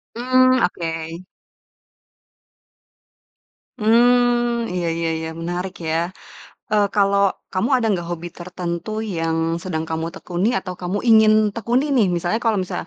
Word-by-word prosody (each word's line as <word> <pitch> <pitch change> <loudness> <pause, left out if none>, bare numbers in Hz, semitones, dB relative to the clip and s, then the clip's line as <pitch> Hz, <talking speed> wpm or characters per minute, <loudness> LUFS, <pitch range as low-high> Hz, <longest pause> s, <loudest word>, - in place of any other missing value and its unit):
Mmm, 255 +2 +3
oke. 165 -1 -3 2.6
Mmm, 240 +1 +3
iya 175 -2 -1
iya 165 0 -1
iya, 160 - -4
menarik 175 +2 -3
ya, 160 +1 +1 0.8
eee, 210 -1 +4
kalau 200 -1 +3 0.3
kamu, 190 +5 0
ada 240 -3 0
nggak 175 -3 -2
hobi 175 0 -5
tertentu 175 +1 -5 0.3
yang 165 0 -1 0.3
sedang 160 -4 -3
kamu 160 0 -2
tekuni 185 +1 -2
atau 185 -2 -6
kamu 180 +3 -2
ingin 220 -1 +7 0.2
tekuni 235 +4 0
nih, 225 -5 +4
misalnya, 175 +4 -1
kalau 225 -3 +2
misalnya, 180 - -5
190 Hz, 125 wpm, -21 LUFS, 170-230 Hz, 2.6 s, ingin